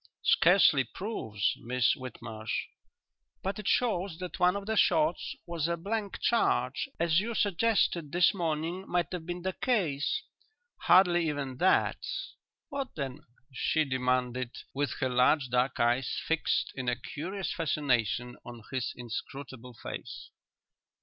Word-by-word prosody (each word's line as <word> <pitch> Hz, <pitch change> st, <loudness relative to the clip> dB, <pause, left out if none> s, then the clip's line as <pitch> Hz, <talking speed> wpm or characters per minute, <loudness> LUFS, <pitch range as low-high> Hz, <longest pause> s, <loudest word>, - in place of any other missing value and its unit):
"Scarcely 165 Hz, -6 st, +5 dB
'proves,' 110 Hz, -, -2 dB
Miss 125 Hz, -1 st, +2 dB
Whitmarsh." 115 Hz, -3 st, -5 dB, 0.8 s
"But 195 Hz, +3 st, -2 dB
it 210 Hz, -, -6 dB
shows 195 Hz, -8 st, +1 dB
that 180 Hz, 0 st, -6 dB
one 180 Hz, +1 st, +4 dB
of 200 Hz, 0 st, -4 dB
the 220 Hz, +1 st, -1 dB
shots 310 Hz, +4 st, +2 dB
was 170 Hz, -3 st, -2 dB
a 170 Hz, 0 st, -1 dB
blank 205 Hz, +3 st, -3 dB
charge, 235 Hz, +2 st, +1 dB
as 165 Hz, 0 st, +3 dB
you 230 Hz, +3 st, -3 dB
suggested 200 Hz, -6 st, +1 dB
this 175 Hz, +5 st, +4 dB
morning 170 Hz, +1 st, -2 dB
might 175 Hz, -2 st, 0 dB
have 175 Hz, -3 st, -5 dB
been 175 Hz, 0 st, -4 dB
the 190 Hz, 0 st, -1 dB
case." 185 Hz, -, 0 dB, 0.6 s
"Hardly 175 Hz, -2 st, +5 dB
even 140 Hz, -3 st, -3 dB
that." 185 Hz, +7 st, +2 dB, 0.7 s
"What 275 Hz, -2 st, -4 dB
then?" 140 Hz, -2 st, -4 dB, 0.3 s
she 155 Hz, +4 st, +1 dB
demanded, 125 Hz, -1 st, 0 dB, 0.2 s
with 140 Hz, -1 st, -1 dB
her 130 Hz, -, +2 dB
large 125 Hz, +2 st, +3 dB
dark 125 Hz, +2 st, +1 dB
eyes 120 Hz, +2 st, +1 dB
fixed 165 Hz, -1 st, +1 dB
in 130 Hz, -2 st, -2 dB
a 125 Hz, -, +1 dB
curious 175 Hz, -, -4 dB
fascination 125 Hz, -, 0 dB
on 120 Hz, -2 st, -10 dB
his 130 Hz, -3 st, -2 dB
inscrutable 125 Hz, +1 st, -7 dB
face. -, -, -7 dB
155 Hz, 135 wpm, -30 LUFS, 125-185 Hz, 0.8 s, Scarcely